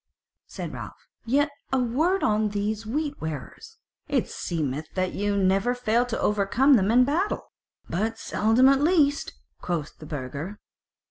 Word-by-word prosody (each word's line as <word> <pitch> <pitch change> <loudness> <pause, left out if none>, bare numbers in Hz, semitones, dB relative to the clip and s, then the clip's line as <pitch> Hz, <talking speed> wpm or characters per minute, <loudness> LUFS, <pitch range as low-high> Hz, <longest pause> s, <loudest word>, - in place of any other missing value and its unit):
Said - - -6
Ralph: - - -9 0.2
"Yet 285 +4 +2 0.2
a 265 - +2
word 295 +11 +1
on 215 0 +2
these 210 +1 -2
Wheat 290 +4 -2
wearers; 155 -5 -7 0.3
it - - 0
seemeth 155 -2 -3
that 185 -1 0
ye 205 +1 -1
never 195 +5 +2
fail 245 0 +1
to 230 - -3
overcome 210 +7 +3
them 200 -5 +4
in 245 +3 +6
battle?" 340 +9 -1 0.4
"But 220 +6 -1
seldom 225 +4 +3
at 275 0 +4
least," 295 -3 +2 0.3
quoth 165 -4 -3
the 155 - -10
Burgher. 145 +8 -5
220 Hz, 145 wpm, -26 LUFS, 190-265 Hz, 0.4 s, in